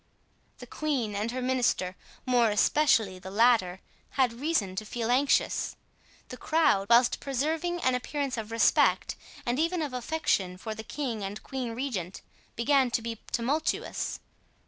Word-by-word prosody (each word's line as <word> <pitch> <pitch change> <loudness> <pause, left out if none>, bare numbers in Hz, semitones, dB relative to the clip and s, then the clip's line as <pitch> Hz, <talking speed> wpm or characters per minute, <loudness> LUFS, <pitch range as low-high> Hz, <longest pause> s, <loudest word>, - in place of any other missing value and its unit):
The - - -10
queen 270 -9 -2
and 210 +3 -1
her 255 +1 -3
minister, 245 -8 0 0.3
more 245 -3 +3
especially 210 -3 +2
the 190 - -9
latter, 205 -4 +3 0.4
had 255 -3 +3
reason 235 - -1
to 215 - -2
feel 230 +2 -3
anxious. 275 +3 +2 0.5
The 250 - -7
crowd, 305 -13 +2
whilst 235 +1 +5
preserving 315 +6 -1
an 255 - +2
appearance 275 +2 -2
of 220 -2 -5
respect 230 0 +3 0.3
and 245 +3 0
even 335 +1 +1
of 285 -4 -4
affection 240 -9 -1
for 220 +4 -5
the 220 - -7
king 235 -6 -4
and 200 +2 -6
queen 250 -4 -4
regent, 210 -9 -4 0.3
began 265 +2 +3
to 235 - 0
be 230 -1 -5
tumultuous. 280 +7 -1
245 Hz, 145 wpm, -28 LUFS, 215-275 Hz, 0.5 s, whilst